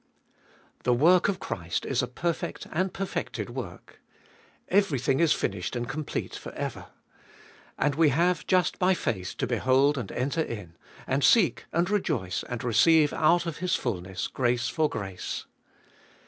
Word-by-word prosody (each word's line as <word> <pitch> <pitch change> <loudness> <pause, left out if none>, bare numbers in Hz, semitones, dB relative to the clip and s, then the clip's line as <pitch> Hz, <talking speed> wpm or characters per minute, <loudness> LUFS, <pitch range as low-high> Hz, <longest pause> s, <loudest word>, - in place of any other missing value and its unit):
1. - - -42 0.8
The 125 - +4
work 175 +8 +5
of 195 - -2
Christ 85 -4 -3
Is - - +1
a - - -2
perfect 170 -1 -3
and 185 +4 0
perfected 195 +1 -4
work. - - -8 0.7
Everything 150 - +2
is 165 -3 +4
finished 95 +2 -1
and 120 -1 -2
complete 150 +2 -4
for - - -8
ever. - - -5 0.9
And 145 - +1
we 155 +1 +4
have 175 +6 +1
just 180 -3 +2
by 185 0 +3
faith 95 - -3
to 135 - 0
behold 130 +4 +2
and 125 - -5
enter 140 +6 -1
In, 105 - -6 0.3
and 135 +1 0
seek 175 - +4
and 170 +2 +1
rejoice, 155 - -1
and 125 -2 -4
receive 145 +6 +4
out 170 +3 +3
of 165 -2 -4
His 180 +1 0
fulness 95 -5 -3
grace 120 -2 0
for 155 -2 +1
grace. 95 -3 -5
140 Hz, 155 wpm, -27 LUFS, 120-170 Hz, 0.9 s, work